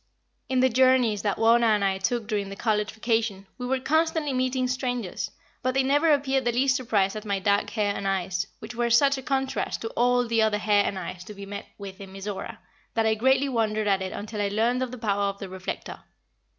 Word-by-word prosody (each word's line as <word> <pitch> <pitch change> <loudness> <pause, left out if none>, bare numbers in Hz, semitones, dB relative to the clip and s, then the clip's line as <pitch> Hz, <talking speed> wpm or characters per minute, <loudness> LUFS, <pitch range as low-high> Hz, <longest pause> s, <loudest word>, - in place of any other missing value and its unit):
In 260 -1 +2
the 260 - +5
journeys 250 -4 +3
that 205 -2 -1
Wauna 230 -1 +4
and 200 -1 0
I 190 -1 0
took 230 +3 -1
during 205 -3 -2
the 195 - -7
college 210 0 0
vacation, 220 -3 -1
we 250 - -3
were 265 +1 +1
constantly 315 +1 +1
meeting 255 0 0
strangers, 245 -8 -2 0.3
but 255 +1 -1
they 270 - +3
never 290 +4 +3
appeared 270 -2 +2
the 240 - +1
least 260 +3 +2
surprised 215 -6 +1
at 215 - -5
my 200 -2 -1
dark 200 +1 +1
hair 205 -3 0
and 195 - -3
eyes, 190 0 -1
which 220 +2 -9
were 240 0 0
such 275 +3 +4
a - - -7
contrast 265 0 -1
to 225 - -3
all 245 +1 +2
the 230 -1 +2
other 215 -1 +2
hair 210 -1 +3
and 195 - -2
eyes 180 -1 -6
to 210 - -9
be 200 0 -8
met 200 +1 -7
with 200 -1 -9
in 195 -1 -9
Mizora, 195 0 -6 0.4
that 225 -1 +2
I 220 - +3
greatly 265 +5 +3
wondered 215 -4 0
at 195 -1 +2
it 190 0 -3
until 210 0 -5
I 205 - +1
learned 230 +5 +1
of 255 - -1
the 255 - -8
power 205 -3 0
of 200 0 -2
the 195 -1 -7
reflector. 185 0 -6
225 Hz, 230 wpm, -26 LUFS, 200-255 Hz, 0.4 s, the